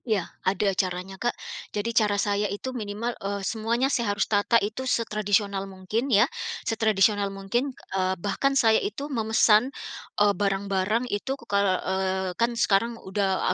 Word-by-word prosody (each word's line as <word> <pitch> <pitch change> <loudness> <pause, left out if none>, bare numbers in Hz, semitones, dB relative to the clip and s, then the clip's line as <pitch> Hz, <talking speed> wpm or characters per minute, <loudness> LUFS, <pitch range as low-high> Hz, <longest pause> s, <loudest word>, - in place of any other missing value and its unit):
Iya, 215 -7 0 0.2
ada 195 +1 +1
caranya, 185 0 -2
Kak. 240 - +2 0.5
Jadi 230 +3 -1
cara 210 -3 +3
saya 205 0 0
itu 205 +7 -4
minimal, 225 +1 -3
eee, 200 0 -3
semuanya 230 +4 0
saya 235 -3 +1
harus - - +2
tata 205 +2 +3
itu 215 +3 -2
setradisional 205 -3 0
mungkin 195 +7 -3
ya, 210 -2 +6 0.4
setradisional 210 -2 +2
mungkin, 195 +7 -2 0.2
eee, 185 0 +1
bahkan 275 +9 0
saya 225 -3 +4
itu 225 +7 -4
memesan, 220 0 +4 0.5
eee, 205 0 +4
barang-barang 200 +3 0
itu 250 +4 -3
kal 200 -2 +2 0.2
eee, 190 0 -1
kan 235 +5 +1
sekarang 230 +2 +2
udah 190 -2 0
205 Hz, 145 wpm, -26 LUFS, 195-230 Hz, 0.5 s, ya